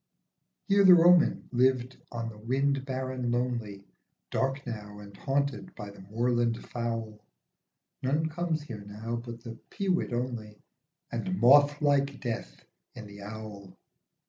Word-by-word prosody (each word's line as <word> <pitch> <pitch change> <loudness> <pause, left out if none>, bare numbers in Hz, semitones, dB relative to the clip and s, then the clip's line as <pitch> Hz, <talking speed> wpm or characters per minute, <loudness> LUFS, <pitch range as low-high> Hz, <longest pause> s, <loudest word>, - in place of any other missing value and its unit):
Here 200 0 +5
the 185 -2 +10
Roman 175 0 +5
lived 125 0 +2
on 115 -1 -3
the 110 - -11
wind 135 +4 0
barren 130 -2 -3
lonely, 120 -5 -2 0.5
Dark 135 +1 -1
now 105 -4 -6
and 100 -1 -11
haunted 140 - -1
by 105 -2 -7
the 100 - -15
moorland 115 +3 0
fowl; 115 -3 -4 0.8
None 150 +5 +1
comes 160 -1 -2
here 115 -8 -8
now 110 +3 -5
but 120 0 -8
the 115 -1 -8
peewit 190 - 0
only, 120 -4 -4 0.5
And 185 -1 -2
moth 145 +4 +6
like 140 -1 +2
death 115 - -5 0.3
in 115 - -8
the 100 0 -11
owl. 105 -1 -9
120 Hz, 135 wpm, -29 LUFS, 110-140 Hz, 0.8 s, the